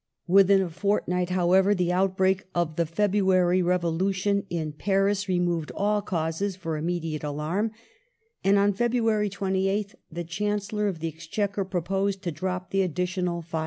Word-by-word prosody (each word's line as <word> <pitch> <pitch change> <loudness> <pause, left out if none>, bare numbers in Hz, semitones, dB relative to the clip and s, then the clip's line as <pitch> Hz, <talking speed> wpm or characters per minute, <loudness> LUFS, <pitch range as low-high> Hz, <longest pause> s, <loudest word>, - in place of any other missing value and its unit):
Within 195 +1 +5
a 180 - -4
fortnight, 180 -1 0
however, 185 +2 +3
the 180 -2 0
outbreak 190 +1 +1
of 170 -3 0
the 170 -1 0
February 185 -1 +2
Revolution 185 +3 0
in 160 -3 -2
Paris 195 +3 0
removed 175 -3 0
all 210 +1 +1
cause 180 +1 -2
for 165 -4 -4
immediate 160 -1 -3
alarm, 155 +9 -1 0.7
and 200 +1 +4
on 200 +1 +3
February 225 -1 +1
28th 195 +1 -1 0.2
the 175 +2 -4
Chancellor 210 +4 -2
of 175 -5 -3
the 165 - -1
Exchequer 195 +6 -3
proposed 195 +2 -1
to 175 - -2
drop 180 +3 -4
the 195 - +2
additional 180 -1 -1
5d. 165 0 -4
185 Hz, 145 wpm, -26 LUFS, 170-200 Hz, 0.7 s, Within